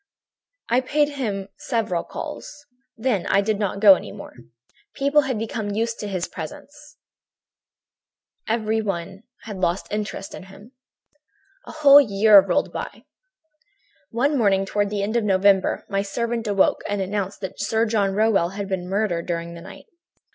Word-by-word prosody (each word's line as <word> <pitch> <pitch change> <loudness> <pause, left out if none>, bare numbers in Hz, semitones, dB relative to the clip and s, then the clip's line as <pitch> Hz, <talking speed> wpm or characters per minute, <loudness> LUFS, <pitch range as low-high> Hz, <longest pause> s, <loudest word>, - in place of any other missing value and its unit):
"I 245 +2 +2
paid 290 +3 +1
him 210 -9 -4
several 220 -9 -1
calls. 290 0 -8 0.3
Then 220 -6 -1
I 200 - +3
did 210 0 -1
not 200 -2 -2
go 200 -2 +9
any - - -4
more. 200 - -10 0.6
People 280 +2 +3
had 255 - -1
become 220 -1 -4
used 225 +3 -2
to 210 - -4
his 185 -3 -3
presence; 295 - -10 1.5
everybody 215 -5 -2 0.2
had 210 -4 -7
lost 180 0 -1
interest 210 -2 -4
in 190 - -9
him. 200 +5 -15 1.0
"A - - -7
whole 290 -2 +7
year 210 -3 +6
rolled - - 0
by. - - -7 1.1
One 275 +6 0
morning, 195 -6 +2
toward 205 +1 -1
the 205 -1 -2
end 215 +3 -2
of 235 - +2
November, 195 -1 +2
my 195 0 -1
servant 230 +3 -3
awoke 200 -2 +2
me - - -5
and 205 - -2
announced 200 0 -3
that 190 -1 -6
Sir 225 0 +1
John 205 -3 0
Rowell 210 -5 +2
had 200 +1 -5
been 185 -2 -4
murdered 195 -4 -1
during 170 -1 -3
the 170 - -10
night. - - -12
205 Hz, 155 wpm, -23 LUFS, 195-230 Hz, 1.5 s, go